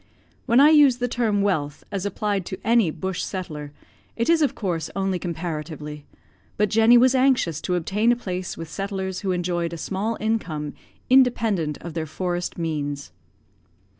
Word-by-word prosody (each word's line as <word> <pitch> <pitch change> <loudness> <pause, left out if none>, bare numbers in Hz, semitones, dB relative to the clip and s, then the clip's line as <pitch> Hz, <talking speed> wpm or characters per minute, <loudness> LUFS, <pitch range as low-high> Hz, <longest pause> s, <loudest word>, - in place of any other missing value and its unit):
When 235 +2 +5
I 295 +3 +8
use 290 -5 +6
the 245 0 -1
term 220 -5 0
wealth 150 -8 -1
as 200 0 -2
applied 205 -1 -1
to 190 - -5
any 230 -6 +3
bush 190 +3 -4
settler, 155 -6 -5 0.4
it 230 +4 -1
is 330 -1 +4
of 290 - +2
course 170 -6 -2
only 195 -2 0
comparatively; 155 -4 -5 0.5
but 210 0 +2
Jenny 225 +2 +6
was 255 +2 +5
anxious 255 - +2
to 180 - -1
obtain 205 +7 +1
a - - +3
place 185 -6 -5
with 165 - -6
settlers 190 0 -4
who 195 -2 -2
enjoyed 175 -1 -1
a - - -5
small 205 +7 -2
income 175 -10 -2 0.3
independent 225 - +3
of 170 -1 -7
their 160 -2 -3
forest 175 +2 -3
means. 145 -4 -3
190 Hz, 165 wpm, -24 LUFS, 165-225 Hz, 0.5 s, I